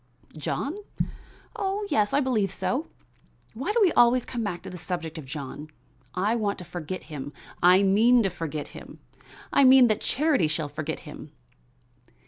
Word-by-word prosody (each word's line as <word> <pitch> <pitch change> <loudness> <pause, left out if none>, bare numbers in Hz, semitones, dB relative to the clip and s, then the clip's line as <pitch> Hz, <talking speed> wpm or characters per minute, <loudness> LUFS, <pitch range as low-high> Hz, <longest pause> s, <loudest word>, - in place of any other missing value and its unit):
"John? 280 - -3 0.8
Oh, 400 +1 -2
yes, 210 -1 +2
I 285 - +3
believe 220 -8 +1
so. 200 - -2 0.7
Why 270 - -2
do 450 - -1
we 365 - +4
always 240 +1 +4
come 235 -2 -4
back 180 -5 -4
to - - -7
the 180 - -8
subject 165 -2 -4
of 140 - -10
John? 145 +2 -7 0.5
I 200 +5 +1
want 210 -3 -1
to 180 - -9
forget 175 +1 -6
him; 145 -2 -7 0.3
I 180 +3 +6
mean 225 +5 +5
to 195 - 0
forget 155 -4 -5
him; - - -11 0.6
I 280 - +5
mean 260 -2 +8
that 215 - +1
Charity 285 - +2
shall 155 -1 -3
forget 155 +2 -4
him." 150 -1 -11
195 Hz, 165 wpm, -26 LUFS, 160-250 Hz, 0.8 s, mean